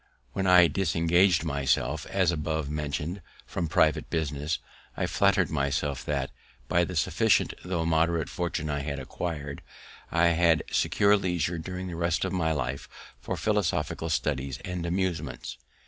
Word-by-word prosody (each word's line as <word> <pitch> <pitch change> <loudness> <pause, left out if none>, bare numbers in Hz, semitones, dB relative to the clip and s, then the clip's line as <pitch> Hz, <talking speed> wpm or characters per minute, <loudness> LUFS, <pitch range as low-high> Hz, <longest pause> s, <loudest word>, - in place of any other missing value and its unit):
When 95 -1 -1
I 90 -1 +8
disengaged 85 0 +3
myself, 70 -1 0
as 95 -3 +2
above 80 -2 -2
mentioned, 75 +5 -3 0.2
from 85 - -3
private - - +2
business, 75 -1 -1 0.4
I - - 0
flatter'd - - +2
myself 70 -2 -1
that, - - -1 0.4
by 85 +5 +3
the 90 - -6
sufficient 80 - +2
tho' 90 -3 -1
moderate 80 0 +2
fortune 85 -3 -3
I 75 -1 -1
had 70 0 -3
acquir'd, 75 +1 -5 0.5
I 85 +1 +4
had 85 -1 +3
secured 100 -1 +3
leisure 85 -2 -1
during 90 +3 -5
the 90 -2 -5
rest 85 +1 0
of 95 - -3
my 80 -3 +1
life 70 -2 -3 0.3
for - - -4
philosophical 85 -6 0
studies 70 -4 -1
and 90 -1 -3
amusements. 85 -9 -2
80 Hz, 145 wpm, -28 LUFS, 75-90 Hz, 0.5 s, I